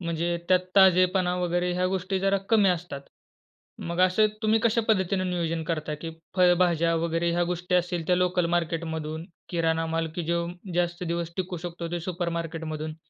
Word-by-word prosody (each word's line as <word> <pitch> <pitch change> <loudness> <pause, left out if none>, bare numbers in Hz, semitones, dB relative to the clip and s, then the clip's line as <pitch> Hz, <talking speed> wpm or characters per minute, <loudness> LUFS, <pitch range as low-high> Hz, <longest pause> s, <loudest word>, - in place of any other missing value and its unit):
म्हणजे 170 0 -1
त्यात 185 -1 +5 0.2
ताजेपणा 185 -1 +5
वगैरे 175 0 0
ह्या 180 +1 +1
गोष्टी 190 +1 -1
जरा 195 0 +2
कमी 210 -4 +5
असतात. 175 -5 -2 0.8
मग 170 +1 -3
असे 185 +4 +4 0.2
तुम्ही 220 +1 +3
कशा 230 0 +2
पद्धतीने 190 -2 +2
नियोजन 165 -2 -1
करता 155 -2 -2
की 165 - -4 0.3
फळभाज्या 175 -2 +3
वगैरे 165 +1 0
ह्या 175 0 +1
गोष्टी 180 +1 -2
असेल, 175 -2 0
ते 180 0 +3
लोकल 180 -1 +1
मार्केटमधून. 160 -1 -3 0.2
किराणा 165 -1 0
माल 165 0 -1
की 175 - -3
जो 170 +1 0 0.3
जास्त 175 0 -1
दिवस 170 0 -3
टिकू 185 -1 -3
शकतो 170 -1 -6
तो 175 - -1
सुपरमार्केटमधून. 165 -3 -4
175 Hz, 160 wpm, -26 LUFS, 165-180 Hz, 0.8 s, त्यात